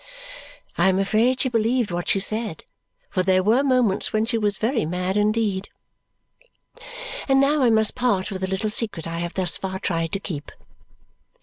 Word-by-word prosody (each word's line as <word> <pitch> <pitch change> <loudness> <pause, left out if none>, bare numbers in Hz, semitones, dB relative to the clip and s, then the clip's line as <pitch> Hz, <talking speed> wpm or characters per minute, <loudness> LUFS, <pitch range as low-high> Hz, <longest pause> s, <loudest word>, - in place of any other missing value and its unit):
I 190 - +4
am 190 - +1
afraid 220 +6 +1
she 260 - +1
believed 230 -1 0
what 175 0 -3
she 195 - +2
said, 215 -2 0 0.5
for 185 - 0
there 185 0 +2
were 225 +7 +3
moments 250 -7 +2
when 215 0 +1
she 230 +1 -2
was 210 -3 0
very 230 +2 0
mad 180 +4 -2
indeed. 210 -2 0 1.6
And 270 -1 +4
now 285 +2 +3
I 250 - +4
must 220 -1 +3
part 230 -7 0
with 190 -1 -5
the 190 - -2
little 195 +3 0
secret 210 -7 0
I 165 0 -4
have 175 0 -5
thus 185 -2 +3
far 190 0 -4
tried 165 -3 -2
to 195 - -1
keep. 155 -7 -6
205 Hz, 180 wpm, -23 LUFS, 185-230 Hz, 1.6 s, I